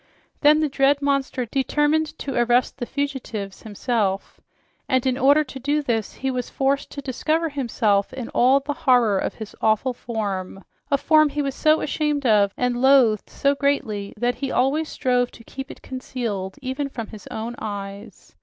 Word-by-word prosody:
Then 300 +1 +5
the 310 - +2
dread 275 0 +2
monster 275 -2 0
determined 295 +5 0
to 275 - -4
arrest 240 +2 +2
the 240 - -3
fugitives 265 -8 -4
himself, 210 -2 -2 0.5
and 260 -1 +2
in 260 -1 +2
order 280 +3 +4
to 265 -1 -9
do 290 +3 0
this 225 -6 -1
he 265 0 -2
was 250 -2 -3
forced 275 +1 0
to 280 - -6
discover 315 +5 0
himself 230 -7 0
in 260 -3 -6
all 260 +3 +4
the 285 +1 -4
horror 245 -8 +3
of - - -3
his 220 -2 -9
awful 220 +4 +2
form, 200 -5 -4 0.3
a 280 - +3
form 310 +1 +4
he 295 +1 -2
was 275 -1 -2
so 310 +3 +3
ashamed 295 -2 -1
of 205 -4 +4
and 245 -1 0
loathed 260 -6 +4
so 280 0 +1
greatly 275 -8 -1
that 245 +3 +1
he 275 0 -4
always 290 +5 +1
strove 245 -1 +1
to 230 - -14
keep 270 +3 -8
it - - -11
concealed, 230 -7 -4
even 270 +2 -3
from 235 -4 -5
his 215 -3 -11
own 225 +2 -5
view. 200 -1 -6
260 Hz, 175 wpm, -23 LUFS, 225-280 Hz, 0.5 s, Then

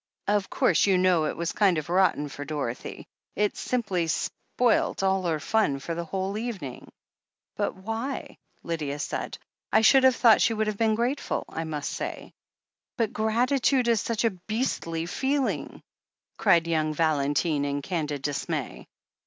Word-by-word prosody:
"Of 205 -1 +1
course, 170 +3 +3
you 190 -2 +4
know, 180 -3 +3
it - - -3
was 170 0 -1
kind 195 -5 +3
of 155 - -3
rotten 175 -4 +2
for 145 0 -7
Dorothy. 145 -5 -5 0.3
It 210 0 +1
simply 195 -9 -1
spoilt 230 +6 0
all 190 0 +2
her 160 -2 +1
ftm 155 -3 +1
for 165 +5 -4
the 170 +1 -4
whole 195 +4 -3
evening." 195 - -6 0.6
"But - - -1
why?" 225 +8 -5 0.2
Lydia 150 -4 -3
said. 145 - -4 0.3
"I 220 - +5
should 265 +4 +6
have 260 -1 +6
thought 230 -4 +6
she 225 - +3
would 215 0 0
have 215 -1 -2
been 220 -1 +3
grateful, 245 +5 -1
I 165 - -4
must 150 -2 -3
say." - - -5 0.6
*'But 230 -3 0
gratitude 245 +4 +2
is 230 -3 +3
such 230 -1 -1
a 230 - +3
beastly 180 -4 -3
feeling 260 - -1
T - - -15 0.6
cried 170 -1 +4
young 155 -2 0
Valentine 150 -1 +1
in 145 0 -2
candid 150 -6 -3
dismay. 145 -1 -3
185 Hz, 160 wpm, -26 LUFS, 155-225 Hz, 0.6 s, should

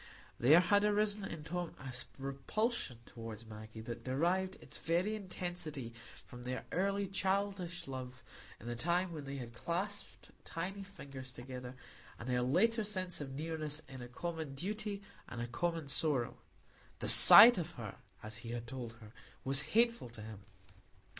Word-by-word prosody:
There 150 +8 +7
had 205 +3 +3
arisen 210 -1 +1
in 160 -2 -7
Tom 175 +2 -4
a 130 -1 -8 0.2
repulsion 140 - -3
toward 115 -1 -9
Maggie 110 0 -10
that 115 +1 -7
derived 175 +9 0
its - - -11
very 180 +6 0
intensity 175 - -4 0.3
from 125 0 -11
their 125 +1 -5
early 200 +2 0
childish 195 -3 -2
love 130 -1 -7 0.4
in - - -13
the 120 0 -4
time 175 +8 0
when 150 -3 -7
they 135 0 -6
had 120 -3 -7
clasped 185 - -4
tiny 190 +4 -5
fingers 135 -10 -10
together, 125 0 -8 0.4
and 115 - -9
their 125 -1 +1
later 215 - +2
sense 185 -5 -2
of 135 -2 -6
nearness 155 0 -4
in 130 -1 -10
a 120 - -7
common 160 +2 -5
duty 205 +4 -4 0.3
and 120 - -7
a 120 - -2
common 165 +5 -3
sorrow; 140 -3 0 0.6
the - - -5
sight 225 +1 +12
of 175 +1 -5
her, 110 -7 -7 0.3
as 110 +1 -6
he 115 0 -9
had 120 0 -5
told 120 -1 -7
her, 110 -2 -15 0.3
was 135 +1 +1
hateful 235 - +2
to 110 -2 -11
him. 110 -2 -9
150 Hz, 160 wpm, -34 LUFS, 125-185 Hz, 0.6 s, sight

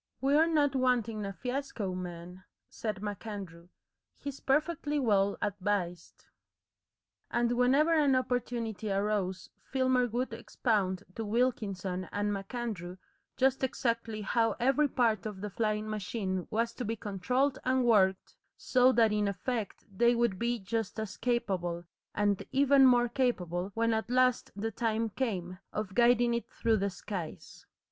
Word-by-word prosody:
"We're 290 +4 +4
not 295 -4 +2
wanting 235 -5 +1
a - - -4
fiasco, 250 -5 -3
man," 180 0 -7 0.3
said 210 -3 -4
MacAndrew. 200 -5 -6 0.5
"He's 280 -1 -6
perfectly 295 +1 0
well 200 -5 +2
advised." 195 -4 -2 1.0
And 240 0 +1
whenever 265 +7 +3
an 290 -4 +4
opportunity 240 -4 -2
arose 195 -3 -1 0.2
Filmer 260 -1 +2
would 240 +1 -2
expound 205 -5 -1
to 225 - -4
Wilkinson 205 -5 -1
and 205 0 -1
MacAndrew 195 -3 -5 0.4
just 265 0 +2
exactly 230 -4 -1
how 225 +3 +1
every 270 +4 +3
part 225 -6 +1
of 205 -3 -7
the 205 +1 -5
flying 215 0 -1
machine 195 -3 -3
was 230 +1 0
to 250 - -5
be 225 +1 -2
controlled 250 +7 0
and 255 0 +2
worked, 190 -5 +3 0.2
so 255 0 +4
that 225 -3 +4
in 210 -1 +1
effect 205 +2 -3
they 240 +4 +4
would 235 -5 +1
be 240 +1 0
just 220 +1 -3
as 215 -2 -4
capable, 185 -8 -1 0.3
and 205 -1 +1
even 275 0 +6
more 245 -1 +5
capable, 190 -8 -1
when 230 0 +2
at 220 +1 -2
last 255 0 +2
the 220 +3 -3
time 225 0 -1
came, 185 -7 -3
of 210 -2 -4
guiding 240 +1 +4
it 235 - -3
through 225 -1 +1
the 200 0 0
skies. 185 -3 -7
225 Hz, 140 wpm, -31 LUFS, 195-250 Hz, 1.0 s, even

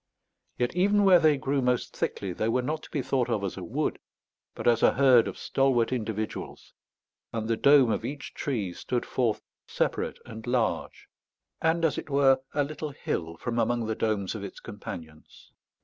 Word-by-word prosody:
Yet 120 +6 -1
even 205 +3 +3
where 185 -3 +7
they 155 -3 +4
grew 135 +1 0
most 125 -1 0
thickly 95 -2 -2
they 110 +5 -1
were 125 +2 +1
not 155 +4 -2
to - - -13
be 140 - -2
thought 125 -1 0
of 110 -4 0
as 95 - -3
a - - -7
wood, - - -2 0.6
but - - -4
as 115 -1 +4
a - - +5
herd 130 -3 +5
of - - -6
stalwart 130 -4 +1
individuals; 110 -3 -4 0.6
and 110 -1 -3
the 115 - +1
dome 140 -1 +5
of - - -1
each 140 +4 -6
tree 105 -11 -2
stood 120 +6 -3
forth 120 -4 0 0.2
separate - - -1
and 110 +1 -9
large, 120 -2 -1 0.5
and 165 +1 +2
as 155 - +1
it - - -9
were 135 -1 +4 0.2
a 145 - +3
little 150 0 -6
bill, 80 -1 -2
from 120 +6 -2
among 115 0 +1
the 110 - -1
domes 105 -3 -1
of 110 -3 -6
its 100 - -8
companions. 80 -6 -10
120 Hz, 185 wpm, -27 LUFS, 110-140 Hz, 0.6 s, where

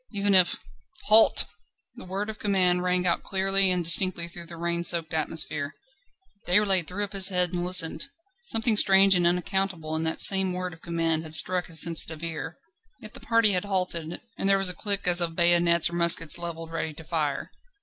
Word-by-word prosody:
Even 200 0 -2
if... 185 -2 +3 0.5
"Halt!" 220 +1 +8 0.5
The - - -14
word 195 +4 -5
of 215 - -16
command 185 -3 0
rang 180 0 -2
out 170 -1 -1
clearly 195 0 0
and 180 -1 -1
distinctly 170 0 +3
through 170 0 -11
the 170 -1 -12
rain 170 0 -4
soaked 170 -2 -1
atmosphere. 155 -2 0 0.7
Déroulède 190 -2 +1
threw 200 +3 -5
up 205 0 -8
his 195 -1 +5
head 180 -2 -1
and 175 0 -2
listened. 180 +6 0 0.4
Something 225 - 0
strange 195 -1 +4
and 175 -1 +1
unaccountable 180 -2 -3
in 160 - -3
that 160 - -4
same 190 -1 +4
word 180 -1 -6
of 165 - -18
command 165 -2 -3
had 160 -1 -2
struck 180 +2 0
his 160 -2 +2
sensitive 165 -1 +1
ear. 165 0 -7 0.4
Yet - - -10
the - - -12
party 230 -2 0
had 185 0 -2
halted, 180 -4 -3 0.2
and 195 - -2
there 195 - +3
was 195 -1 0
a - - -1
click 200 +1 -4
as 175 0 +3
of 165 -1 -2
bayonets 170 -1 +1
or 170 - -9
muskets 170 -1 +1
levelled 165 -1 -7
ready 160 -2 -6
to 160 - -13
fire. 150 -3 -5
175 Hz, 195 wpm, -24 LUFS, 165-190 Hz, 0.7 s, Halt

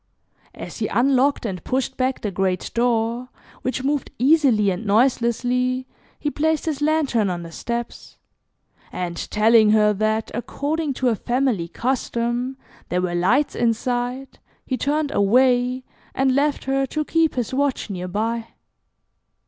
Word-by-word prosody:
As - - -8
he - - 0
unlocked 265 +2 +2
and 185 -6 -4
pushed 265 0 -1
back 255 0 -1
the 210 - -2
great 185 -1 -1
door 235 +1 0 0.3
which 255 0 -2
moved 280 0 -1
easily 255 -7 +4
and 185 +4 -4
noiselessly, 245 +3 +1 0.3
he 295 - -2
placed 315 +1 0
his 300 -3 -2
lantern 295 -9 +2
on 175 -1 -3
the 165 - -9
steps, 235 +7 -5 0.7
and 175 -1 -4
telling 220 0 +5
her 210 -1 +4
that, 215 +2 -1
according 290 +5 -2
to 255 -1 +1
a 230 - +1
family 240 -6 0
custom, 240 +3 -2 0.3
there 180 - 0
were 180 -1 -1
lights 210 +12 +2
inside, 245 +3 -1 0.3
he 260 - -1
turned 290 +3 0
away, 250 +4 +3 0.3
and 265 -1 +2
left 285 +2 +1
her, 270 0 0
to 305 +3 -2
keep 325 0 +1
his 245 -1 -2
watch 275 -5 0
near 180 -1 -4
by. 225 +4 -2
245 Hz, 140 wpm, -22 LUFS, 215-270 Hz, 0.7 s, telling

